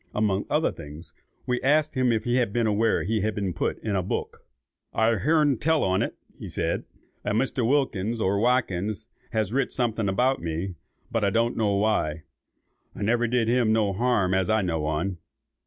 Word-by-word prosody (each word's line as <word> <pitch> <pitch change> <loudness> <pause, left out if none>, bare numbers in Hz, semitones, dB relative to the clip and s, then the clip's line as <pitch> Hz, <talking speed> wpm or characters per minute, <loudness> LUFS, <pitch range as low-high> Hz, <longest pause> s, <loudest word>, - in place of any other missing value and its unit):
Among 105 -2 0
other 155 +2 +2
things, 75 +1 -10 0.3
we 125 0 -1
asked 150 +3 +2
him 130 -2 +2
if 110 -2 0
he 120 +2 +1
was 120 -1 +1
aware 110 +1 +2
that - - -4
he 110 -1 +1
had 110 0 -1
been 100 -3 -2
put - - -1
in 105 -3 -1
a 95 - +2
book. 90 - -4 0.5
"I've 110 -1 +2
hearn 150 -4 +3
tell 160 0 +2
on't," 95 0 0 0.3
said - - -2 0.4
he; - - -2
"a - - 0
Mr. 125 0 0
Wilkins, 115 -6 0
or 100 -1 +1
Watkins, 110 -3 0 0.2
has 110 -2 -1
writ 135 +1 +1
something 115 -4 0
about 125 +7 +1
me, 85 +3 -3 0.4
but 115 -2 0
I 100 - +3
don't 115 +4 +1
know 105 -3 +1
why. 100 -7 0 0.7
_I - - -3
never 120 +3 +2
did 120 -1 +1
him 120 -2 +3
no 110 -3 +2
harm 100 -4 +1
as 95 -1 +1
I 110 -1 +3
know 80 -4 -1
on. 85 +5 -1
110 Hz, 190 wpm, -26 LUFS, 95-120 Hz, 0.7 s, hearn